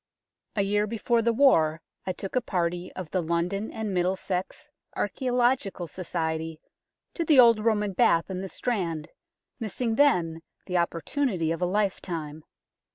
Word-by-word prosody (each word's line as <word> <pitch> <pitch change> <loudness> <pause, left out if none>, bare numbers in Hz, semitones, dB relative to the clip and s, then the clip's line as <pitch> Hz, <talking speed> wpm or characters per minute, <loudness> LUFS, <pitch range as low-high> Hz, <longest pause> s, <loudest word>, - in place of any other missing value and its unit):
A 200 - +2
year 205 +1 +1
before 230 +2 +1
the 235 +1 +2
War 165 - +4 0.3
I - - +1
took 195 +3 -6
a 255 - +3
party 175 -4 -2
of 180 -4 -7
the 185 - +1
London 170 +5 -1
and 220 -3 -3
Middlesex 185 +8 -2 0.3
Archaeological 245 -4 0
Society 160 -2 -3 0.5
to 335 - -1
the 300 -4 +5
old 230 -3 +7
Roman 210 -3 +1
Bath 165 -2 +3
in 185 0 -3
the 190 - -5
Strand, 170 -11 -2 0.5
missing 225 +1 -2
then 180 - +3 0.2
the 180 -1 -1
opportunity 175 - 0
of 165 - -3
a 180 - +2
lifetime. 175 -6 -2
190 Hz, 145 wpm, -27 LUFS, 170-230 Hz, 0.5 s, old